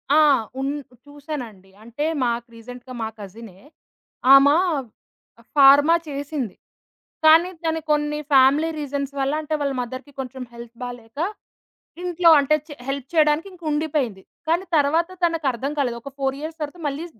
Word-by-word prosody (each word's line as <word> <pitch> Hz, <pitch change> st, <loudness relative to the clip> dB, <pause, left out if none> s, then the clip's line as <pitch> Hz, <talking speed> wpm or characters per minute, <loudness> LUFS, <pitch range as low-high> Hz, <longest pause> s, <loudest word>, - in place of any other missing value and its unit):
ఆ! -, -, +6 dB, 0.4 s
ఉన్ 275 Hz, +1 st, -1 dB, 0.3 s
చూసానండి. 265 Hz, -10 st, -8 dB
అంటే 235 Hz, +6 st, -4 dB, 0.2 s
మాకు, 235 Hz, 0 st, -1 dB
రీసెంట్‌గా 245 Hz, +2 st, -11 dB
మా 220 Hz, -, -1 dB
కజినే, 200 Hz, -1 st, -11 dB, 0.7 s
ఆమా 280 Hz, +2 st, +7 dB, 1.0 s
ఫార్మా 285 Hz, +3 st, +7 dB
చేసింది. 280 Hz, -, -4 dB, 0.7 s
కానీ, 325 Hz, +3 st, +7 dB, 0.2 s
దానికి 320 Hz, -1 st, -1 dB
కొన్ని 300 Hz, 0 st, 0 dB
ఫ్యామిలీ 275 Hz, +4 st, +5 dB
రీజన్స్ 280 Hz, -1 st, -4 dB
వల్ల, 275 Hz, +2 st, 0 dB
అంటే 310 Hz, 0 st, -5 dB
వాళ్ళ 280 Hz, -1 st, 0 dB
మదర్‌కి 255 Hz, +4 st, -7 dB
కొంచెం 260 Hz, 0 st, -7 dB
హెల్త్ 235 Hz, 0 st, -11 dB
బాలేక, 245 Hz, +1 st, -9 dB, 0.8 s
ఇంట్లో 350 Hz, -1 st, +3 dB
అంటే 285 Hz, +2 st, +3 dB
చె 290 Hz, -, -8 dB
హెల్ప్ 275 Hz, -1 st, -3 dB
చేయడానికి 310 Hz, +2 st, +3 dB
ఇంక 350 Hz, -2 st, -17 dB
ఉండిపోయింది. 290 Hz, -10 st, -1 dB, 0.3 s
కానీ, 345 Hz, +3 st, +1 dB
తర్వాత 320 Hz, +5 st, +2 dB, 0.2 s
తనకు 330 Hz, -4 st, -1 dB
అర్థం 265 Hz, +5 st, -3 dB
కాలేదు 245 Hz, -4 st, 0 dB
ఒక 275 Hz, +3 st, -9 dB
4 270 Hz, 0 st, -1 dB
ఇయర్స్ 315 Hz, +1 st, -7 dB
తర్వాత 300 Hz, +4 st, -5 dB
మళ్ళీ, 290 Hz, +4 st, -4 dB
280 Hz, 140 wpm, -22 LUFS, 245-305 Hz, 1.0 s, ఆమా